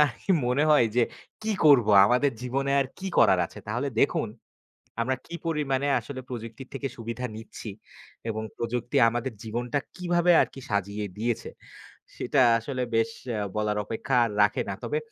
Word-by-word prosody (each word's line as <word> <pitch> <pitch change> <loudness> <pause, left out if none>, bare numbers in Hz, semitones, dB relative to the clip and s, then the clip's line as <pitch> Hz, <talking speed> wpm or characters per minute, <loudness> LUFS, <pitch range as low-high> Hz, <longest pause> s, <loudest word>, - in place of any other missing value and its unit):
আরকি 130 - -6 0.2
মনে 125 +4 +2
হয় 145 -6 +6
যে, 125 - +5 0.4
"কি 220 - 0
করবো, 125 -8 +6 0.2
আমাদের 125 +5 +3
জীবনে 135 +2 -1
আর 135 - 0
কি 195 - -6
করার 95 - +6
আছে?" - - -13
তাহলে 120 +6 -1
দেখুন, 115 - +2 0.7
আমরা 130 +3 0
কি 170 - -7
পরিমাণে 145 -4 0
আসলে 130 -2 -7
প্রযুক্তির 115 +1 -7
থেকে 135 0 -3
সুবিধা 115 +2 -4
নিচ্ছি 110 0 -8 0.6
এবং 110 0 -3
প্রযুক্তি 120 +1 -2
আমাদের 120 +2 -3
জীবনটা 120 +5 -2 0.2
কীভাবে 175 -1 +2
আরকি 135 - -3
সাজিয়ে 100 +1 -1
দিয়েছে, 115 +1 -2 0.7
সেটা 135 +2 +1 0.2
আসলে 130 +2 -4
বেশ 115 0 +2 0.2
এ্যা 105 -2 -1
বলার 105 0 0
অপেক্ষা 115 +4 -2
আর 115 - -2
রাখে 105 - +2
না। 100 - -2
তবে 125 +6 -1
125 Hz, 160 wpm, -27 LUFS, 115-140 Hz, 0.7 s, হয়